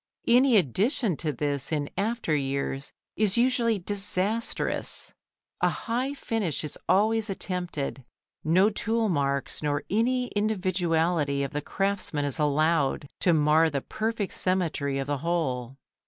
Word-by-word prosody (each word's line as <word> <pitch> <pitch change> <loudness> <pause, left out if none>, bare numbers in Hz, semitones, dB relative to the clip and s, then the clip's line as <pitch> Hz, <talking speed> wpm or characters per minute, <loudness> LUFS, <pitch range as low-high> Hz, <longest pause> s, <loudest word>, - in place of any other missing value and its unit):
Any 245 0 +5
addition 200 - +2
to 155 - -1
this 145 +1 -2
in 145 -2 -1
after 210 -5 0
years 140 0 -2 0.2
is 210 0 +2
usually 235 -2 +3
disastrous. 200 +3 0 0.5
A - - +4
high 255 +5 -2
finish 215 - -2
is 150 - -5
always 220 +2 +3
attempted, 175 -8 -3 0.4
no 185 +7 +4
tool 225 +1 0
marks 140 -4 -1
nor 145 -1 -1
any 245 +4 +1
individuality 175 -8 +1
of 140 - -3
the 150 -1 -3
craftsman 190 -4 -1
is 145 +3 -1
allowed 150 -1 +1
to 180 - +3
mar 155 +1 +4
the 140 -3 -2
perfect 220 +2 -3
symmetry 165 -7 0
of 135 - -2
the 145 0 -2
whole. 135 -6 -2
175 Hz, 130 wpm, -27 LUFS, 145-215 Hz, 0.5 s, Any